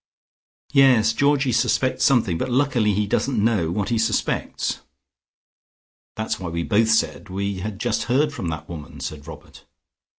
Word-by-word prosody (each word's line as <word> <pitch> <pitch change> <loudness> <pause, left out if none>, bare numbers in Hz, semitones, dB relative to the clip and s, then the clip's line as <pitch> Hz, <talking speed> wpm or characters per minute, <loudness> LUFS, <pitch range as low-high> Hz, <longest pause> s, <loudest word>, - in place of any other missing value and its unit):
Yes, 125 -6 +5
Georgie 140 +1 +2
suspects 125 +3 +1
something, 110 - +2
but 130 - -2
luckily 125 -5 +1
he 105 +1 +1
doesn't 125 +5 -1
know 105 -6 +1
what 100 +3 -2
he 115 -2 0
suspects." 110 - -1 1.4
"That's 110 0 -3
why 90 -2 -5
we 85 0 -3
both 110 +4 +2
said 110 -2 0
we 100 +1 -3
had 105 +1 -5
just 120 -1 -1
heard 145 +4 +1
from 90 - -5
that 80 -1 -5
woman," 80 -3 -9
said 75 +3 -7
Robert. 80 -2 -12
110 Hz, 155 wpm, -22 LUFS, 90-125 Hz, 1.4 s, Yes